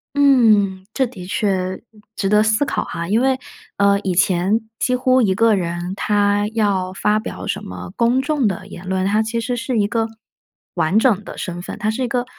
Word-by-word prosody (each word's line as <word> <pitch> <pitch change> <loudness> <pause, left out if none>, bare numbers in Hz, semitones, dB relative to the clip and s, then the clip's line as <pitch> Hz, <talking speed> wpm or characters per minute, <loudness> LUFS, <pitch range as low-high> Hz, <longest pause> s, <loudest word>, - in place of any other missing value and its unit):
嗯， 215 -9 +4
这 265 - +1
的 200 -7 -9
确 185 -1 -1 0.3
值 195 - -1
得 210 +1 +5
思 220 +6 +2
考 - - -2
哈。 170 0 -5
因 215 +5 +2
为， 260 0 +2 0.4
呃， 200 0 +3
以 190 -3 -1
前 185 +4 +2 0.2
几 255 - +1
乎 255 0 +3
一 200 -5 +2
个 225 +2 +4
人 175 0 -3
他 205 0 +1
要 195 -4 0
发 210 +2 +1
表 215 - -7
什 200 - -3
么 195 - -8
公 240 +2 +2
众 285 -3 +1
的 190 -1 -4
言 185 -2 -10
论， 190 0 0
他 210 +3 +2
其 220 +1 -2
实 245 +2 -2
是 255 0 -2
一 205 -1 +2
个 225 +1 -1 0.7
完 170 +6 +1
整 220 -4 +3
的 - - -9
身 175 -1 -5
份。 - - -7
他 215 - -1
是 250 +4 -3
一 - - 0
个 245 +1 -1
210 Hz, 220 characters per minute, -20 LUFS, 190-235 Hz, 0.7 s, 得